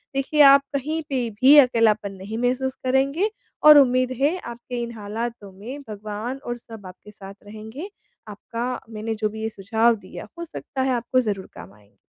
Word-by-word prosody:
देखिए 275 +3 +1
आप 275 0 +8
कहीं 305 +4 -2
पे 250 -4 -1
भी 275 +3 +8
अकेलापन 225 -6 +4
नहीं 195 +4 -7
महसूस 255 +2 -1
करेंगे 275 +10 +1 0.3
और 300 -1 +10
उम्मीद 255 -2 +4
है 300 +7 +2
आपके 240 -2 -7
इन 235 - -5
हालातों 215 0 -6
में 260 +7 -7
भगवान 215 +4 -5
और 240 0 -4
सब 225 -4 -13
आपके 190 +3 -13
साथ 195 -1 -11
रहेंगे। 220 - -8 0.4
आपका 230 +4 -5
मैंने 220 0 -4
जो 215 0 -1
भी 220 +1 -8
ये 220 - -1
सुझाव 225 +3 +1
दिया 210 - -10
हो 340 - -4
सकता 280 -4 -6
है 260 0 +1
आपको 245 +2 0
ज़रूर 200 -5 -4
काम 95 +3 -11
आएँगे। 105 0 -25
235 Hz, 180 wpm, -23 LUFS, 215-265 Hz, 0.4 s, और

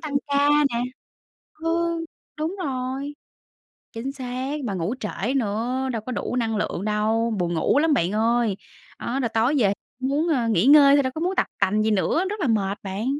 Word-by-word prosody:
tăng 300 -3 -5
ca 285 0 +2 0.2
nè. 235 - 0 0.7
Ừ. 335 +2 0 0.5
Đúng 315 +5 -2
rồi. 265 +1 -3 0.8
Chính 240 +4 -4
xác, 260 +1 -4
mà 205 - -2
ngủ 185 +5 -2
trễ 210 +4 -2
nữa, 245 +3 -1
đâu 225 - -3
có 255 - -3
đủ 245 - -3
năng 225 -3 0
lượng 200 -2 -2
đâu, 220 +2 +1
buồn 175 -1 -1
ngủ 165 - +2
lắm 315 0 +3
bạn 185 -7 +1
ơi. 225 -1 +1 0.4
Đó, 255 - -3
rồi 235 - 0
tối 225 +5 +1
về 205 -6 +3 0.3
cũng 260 - -1
muốn, 300 +5 +1
a, 255 -7 +1
nghỉ 215 -2 +2
ngơi 285 0 +8
thôi 285 - +4
đâu 260 -1 -2
có 315 - -4
muốn 365 +3 0
tập - - +2
tành 210 +3 +2
gì 220 - +1
nữa, 215 - +1
rất 420 0 -4
là 330 - +1
mệt 205 -4 0
bạn. 195 +3 -4
245 Hz, 200 wpm, -24 LUFS, 215-280 Hz, 0.8 s, ngơi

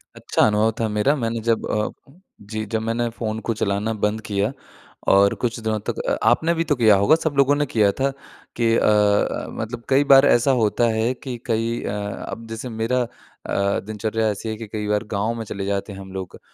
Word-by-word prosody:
अच्छा - - -1
अनुभव 105 +1 +2
था 115 - +1
मेरा। 105 +8 +2
मैंने 115 -4 -2
जब 115 -1 +2
अ 105 0 0 0.5
जी, 110 +1 -5
जब 110 +1 -2
मैंने 115 +1 -1
फ़ोन 110 -1 -4
को 115 - +1
चलाना 105 +1 -1
बंद 105 +1 -1
किया 100 +2 0 0.6
और 100 +1 +5
कुछ 120 -1 -1
दिनों 110 -1 -1
तक - - -3
अ, - - +1
आपने 160 +8 +2
भी 165 0 0
तो 150 - +1
किया 110 -4 +5
होगा 100 +10 +5
सब 160 -2 -2
लोगों 140 +1 +5
ने 145 0 +1
किया 105 -6 +2
था 135 - +2 0.5
कि 115 -1 +2
अ - - +1
अ, 105 -1 +2
मतलब 115 +2 -6
कई 135 +1 +4
बार 135 +1 +8
ऐसा 120 0 +4
होता 110 +2 +2
है 115 +3 +1
कि 130 -4 -4
कई 115 0 -1
अ, - - -3 0.4
अब 115 0 -7
जैसे 115 +3 -5
मेरा 115 +3 0
अ, 120 - -2 0.7
दिनचर्या 110 +1 -2
ऐसी 105 +2 -4
है 110 - -3
कि 115 0 -7
कई 105 0 -4
बार 105 +1 +1
गाँव 105 +3 0
में 115 - -4
चले 100 -2 -5
जाते 100 +1 -2
हैं 95 - -9
हम 95 0 -10
लोग। 95 -1 -7
110 Hz, 215 wpm, -22 LUFS, 105-120 Hz, 0.7 s, बार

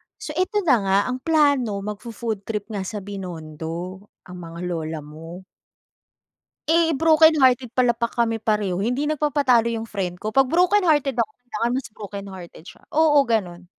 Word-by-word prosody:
So, - - -7
eto 370 +6 0
na 275 -9 +4
nga, 195 -1 +2
ang 255 - -3
plano 285 -7 +2
magfo-food 210 0 -5
trip 215 0 -4
nga 195 -3 -4
sa 210 -3 -5
Binondo, 175 0 -7 0.2
ang 180 0 -11
mga 165 +1 -9
lola 165 -3 -3
mo. 165 +5 -11 1.2
Eh, 330 0 +3
brokenhearted 310 -7 +5
pala 245 -2 +2
pa 235 - -1
kami 230 -2 +1
pareho. 210 -4 0
Hindi 255 +6 -1
nagpapatalo 285 -6 +2
'yung 225 0 -4
friend 185 -4 -4
ko, 215 - -3
'pag 270 - +7
brokenhearted 335 - +3
ako 235 +2 0
kailangan 235 -1 -3
mas 260 +1 -3
brokenhearted 195 -5 -9
siya. - - -14
Oo, 295 -2 +4
ganun. 185 -7 -2
225 Hz, 150 wpm, -23 LUFS, 190-285 Hz, 1.2 s, pag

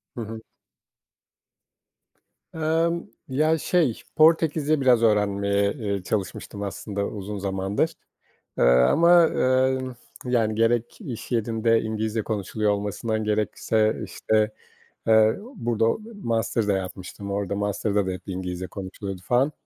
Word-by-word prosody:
Hı 120 - -4
hı. 110 0 -6 2.1
Emm, 165 +2 +1 0.2
ya, 155 +4 +2
şey, 155 -6 +1
Portekizce 155 -2 +3
biraz 125 -3 +4
öğrenmeye, 100 -1 +2
eee, 100 -7 -3
çalışmıştım 100 0 -4
aslında 100 +1 -4
uzun 105 0 -6
zamandır, 100 +10 -1 0.6
eee, - - +2
ama, 160 - +6
eee, 130 -1 +2 0.5
yani, 115 -4 +1
gerek 115 +1 +1
iş 125 -1 -7
yerinde 115 0 +2
İngilizce 110 0 -2
konuşuluyor 105 0 -1
olmasından, 105 +2 -2
gerekse, 110 +1 0
işte, 110 0 0 0.6
eee, 110 0 +5 0.2
burada 115 -1 0 0.4
master 115 -1 0
da - - +4
yapmıştım, 95 +2 -6
orada 100 -1 -2
master'da 100 0 0
da - - -1
hep 90 - -5
İngilizce 90 -1 -4
konuşuluyordu 95 0 -7
falan. 125 +8 +2
110 Hz, 115 wpm, -24 LUFS, 100-125 Hz, 2.1 s, ama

